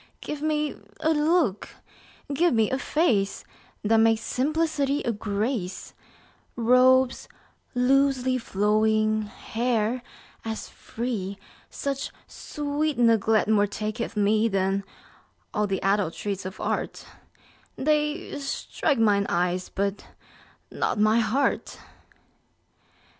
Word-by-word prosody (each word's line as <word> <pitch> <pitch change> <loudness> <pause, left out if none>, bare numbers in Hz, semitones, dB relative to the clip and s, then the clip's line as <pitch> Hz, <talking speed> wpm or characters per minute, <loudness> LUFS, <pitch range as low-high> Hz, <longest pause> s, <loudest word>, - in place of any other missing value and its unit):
Give 295 -1 -6
me 300 -1 0 0.3
a 315 - +2
look, 305 - +1 0.6
give 340 -1 +3
me 220 -2 +2
a 265 - 0
face 235 - +1 0.4
That 225 +2 +3
makes 225 0 +4
simplicity 290 +1 0
a 240 - 0
grace; 210 -1 -3 0.6
Robes 255 +2 +4 0.5
loosely 260 0 +2
flowing, 215 0 +2
hair 230 +2 -1 0.4
as 220 -1 -4
free: 215 -5 -5 0.3
Such 275 -1 -3 0.2
sweet 295 -1 -3
neglect 225 -3 +3
more 210 -1 +3
taketh 215 +2 -4
me 215 +2 +3
10 - - -10
Than 195 0 0 0.7
all 210 -2 +1
th' 195 -1 -1
adulteries 195 0 -1
of 190 - -9
art; - - -3 0.7
They 300 +2 0
strike 280 +1 -1
mine 205 -3 +3
eyes, 180 +1 0
but 200 +1 -3 0.6
not - - -1
my 215 +2 +4
heart. 240 +5 0
225 Hz, 105 wpm, -26 LUFS, 210-275 Hz, 0.7 s, makes